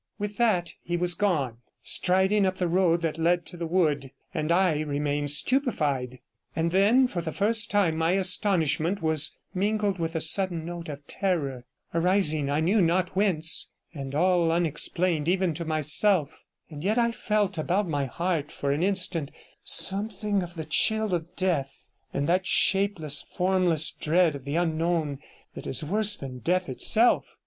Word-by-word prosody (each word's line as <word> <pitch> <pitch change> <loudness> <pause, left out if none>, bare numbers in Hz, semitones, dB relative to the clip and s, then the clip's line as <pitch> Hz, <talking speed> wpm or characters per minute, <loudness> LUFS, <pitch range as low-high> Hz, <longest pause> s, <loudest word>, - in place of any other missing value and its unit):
With 205 -1 -5
that 180 -8 +1
he 175 0 -3
was 175 0 +1
gone, 160 - -1 0.3
striding 190 +3 +1
up 185 0 -2
the 180 - -1
road 170 -1 +1
that 165 -1 -2
led 175 +1 +1
to 180 - -9
the 170 -1 -4
wood, 155 -6 0 0.2
and 155 +2 -2
I 175 -3 +2
remained 145 -1 -2
stupefied; 145 - 0 0.4
and 165 +2 0
then 210 +8 +4
for 185 -8 -3
the 160 -1 -4
first 215 +5 +1
time 185 -6 +1
my 165 +2 +1
astonishment 185 -2 +1
was 155 -1 0 0.2
mingled 205 0 -1
with 165 0 -3
a - - +1
sudden 170 0 +2
note 170 -1 -7
of 145 -1 -8
terror, 140 -12 -2 0.3
arising 165 -4 +1
I 145 +2 0
knew 195 +6 +2
not 180 +2 0
whence, 175 -5 +2 0.2
and 140 -3 -6
all 175 0 +2
unexplained 170 0 0
even 185 -2 +1
to 170 +2 -5
myself, 155 +1 +2 0.3
and 150 0 -8
yet 210 +5 0
I 235 -1 +2
felt 210 -6 -1
about 185 +5 0
my 145 -4 -1
heart 165 +1 -2
for 140 - -3
an 145 +3 -1
instant 180 -5 0 0.3
something 205 0 0
of 175 -1 -8
the 160 -2 -6
chill 215 +6 +1
of 170 +1 -4
death, 145 -8 -2 0.2
and 140 +1 -2
that 185 +2 +1
shapeless, 190 -7 +1
formless 180 -4 +1
dread 165 +1 +1
of 140 -2 -9
the 140 +2 -3
unknown 165 -3 -1 0.3
that - - -9
is 135 - 0
worse 205 +4 +2
than 130 -2 -8
death 180 +7 -1
itself. 220 - +2
170 Hz, 165 wpm, -26 LUFS, 155-190 Hz, 0.4 s, then